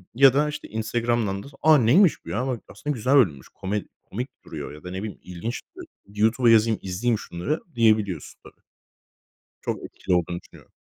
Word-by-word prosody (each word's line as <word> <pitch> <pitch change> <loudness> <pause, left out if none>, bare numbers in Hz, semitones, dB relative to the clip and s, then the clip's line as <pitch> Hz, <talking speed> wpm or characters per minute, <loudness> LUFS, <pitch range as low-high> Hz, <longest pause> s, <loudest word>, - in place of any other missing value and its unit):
ya 135 +1 +7
da, 150 +2 +2
işte, 150 - -6
Instagram'dan 110 -2 -1
da, - - -11
a, 155 -1 +7
neymiş 145 - +4
bu - - -8
ya 125 +5 -1
bak 125 -4 -2
aslında 150 0 -4
güzel 125 +5 +2
bölümmüş, 80 - +3
komed 100 +2 -3 0.2
komik 125 +6 -5 0.2
duruyor - - -7
ya 75 - -12
da 90 - -7
ne 95 +2 -4
bileyim, 110 -2 -6
ilginç 90 +7 -5 0.5
YouTube'a 110 +4 +2
yazayım, 110 -1 +4
izleyeyim 105 +4 0
şunları 90 - -3 0.2
diyebiliyorsun 110 -7 +1
tabii. - - -17 1.0
Çok - - -3
etkili 95 - -2
olduğunu 85 0 -1
düşünüyorum. - - -18
110 Hz, 170 wpm, -25 LUFS, 95-125 Hz, 1.0 s, ya